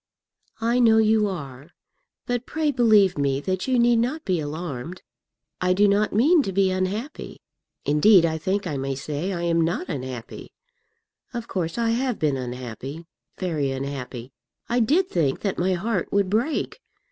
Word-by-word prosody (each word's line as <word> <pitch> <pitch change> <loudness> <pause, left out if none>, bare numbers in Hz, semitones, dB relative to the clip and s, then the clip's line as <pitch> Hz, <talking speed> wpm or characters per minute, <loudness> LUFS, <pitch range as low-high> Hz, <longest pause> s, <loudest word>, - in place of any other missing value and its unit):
"I 235 +2 +1
know 225 -2 +5
you 220 -1 +4
are; 140 -6 -7 0.6
but 245 -1 -2
pray 315 -2 0
believe 215 - +4
me 140 -1 +1
that 185 - -2
you 260 -1 +2
need 240 0 +4
not 270 +7 -2
be 185 -4 +1
alarmed. 155 +1 -5 0.6
I 180 0 +3
do 205 +2 +4
not 205 +1 +2
mean 295 - +4
to 195 - -3
be 190 0 +2
unhappy. 195 +10 -4 0.5
Indeed, 170 +5 +5
I 160 -1 -1
think 195 +5 -1
I 150 -5 -3
may 135 0 -2
say 150 +7 -3
I 175 -2 -3
am 170 -1 +2
not 170 +2 -1
unhappy; 130 -6 -6 0.8
of 235 -1 -4
course 170 -1 -3
I 230 -1 +1
have 245 0 0
been 150 -3 +1
unhappy, 130 +4 -6 0.3
very 155 -7 -1
unhappy. 135 -2 -5 0.4
I 240 +1 +1
did 310 - +3
think 155 - 0
that 200 -3 -2
my 185 +2 +2
heart 190 +1 -2
would 200 -2 +1
break. 245 - -1
185 Hz, 165 wpm, -24 LUFS, 145-225 Hz, 0.8 s, know